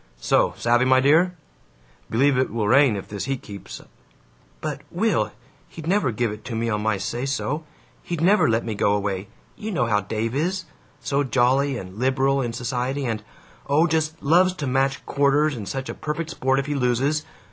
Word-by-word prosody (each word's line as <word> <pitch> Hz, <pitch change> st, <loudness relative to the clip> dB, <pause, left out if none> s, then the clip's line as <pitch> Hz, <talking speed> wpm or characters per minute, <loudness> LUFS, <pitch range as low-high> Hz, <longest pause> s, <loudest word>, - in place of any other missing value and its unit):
So, -, -, +2 dB
savvy, 120 Hz, +2 st, +3 dB
my 130 Hz, 0 st, +5 dB
dear? 160 Hz, +7 st, +4 dB, 0.7 s
Believe 135 Hz, +5 st, +3 dB
it 130 Hz, +1 st, +1 dB
will 110 Hz, -1 st, -1 dB
rain 130 Hz, 0 st, +5 dB
if 100 Hz, -, -6 dB
this 100 Hz, -2 st, -5 dB
heat 135 Hz, -1 st, -3 dB
keeps 100 Hz, -3 st, -9 dB, 0.4 s
" -, -, -33 dB
"But, -, -, -4 dB
Will, -, -, +1 dB, 0.4 s
he'd 160 Hz, -, -9 dB
never 180 Hz, -5 st, +2 dB
give 115 Hz, 0 st, -1 dB
it 105 Hz, 0 st, -8 dB
to 115 Hz, -, -4 dB
me 115 Hz, +1 st, -1 dB
on 105 Hz, -1 st, -1 dB
my 110 Hz, -1 st, +1 dB
say 115 Hz, +5 st, -3 dB
so. 140 Hz, +3 st, -2 dB, 0.4 s
He'd 170 Hz, -2 st, -4 dB
never 185 Hz, -, +4 dB
let 115 Hz, +1 st, +1 dB
me 115 Hz, -, -2 dB
go 100 Hz, 0 st, +2 dB
away. 100 Hz, -1 st, -2 dB, 0.3 s
You 215 Hz, -, -6 dB
know 160 Hz, -, +1 dB
how 105 Hz, -3 st, +2 dB
Dave 110 Hz, +2 st, -3 dB
is: 180 Hz, +6 st, -1 dB, 0.4 s
so 140 Hz, +2 st, 0 dB
jolly 135 Hz, +1 st, +2 dB
and 95 Hz, 0 st, -8 dB
liberal 135 Hz, +1 st, +2 dB
in 120 Hz, -2 st, -2 dB
society, 125 Hz, +3 st, -2 dB
and 110 Hz, -3 st, -2 dB, 0.5 s
oh, 150 Hz, +4 st, +4 dB
just 160 Hz, -1 st, -1 dB
LOVES 180 Hz, +5 st, +4 dB
to 150 Hz, -, -4 dB
match 135 Hz, +1 st, 0 dB
quarters, 145 Hz, +1 st, +2 dB
and 105 Hz, -5 st, -6 dB
such 135 Hz, -1 st, -4 dB
a -, -, -4 dB
perfect 155 Hz, +2 st, -4 dB
sport 135 Hz, -3 st, +1 dB
if 135 Hz, -, 0 dB
he 145 Hz, -, -2 dB
loses! 135 Hz, +3 st, +1 dB
130 Hz, 195 wpm, -23 LUFS, 115-150 Hz, 0.7 s, my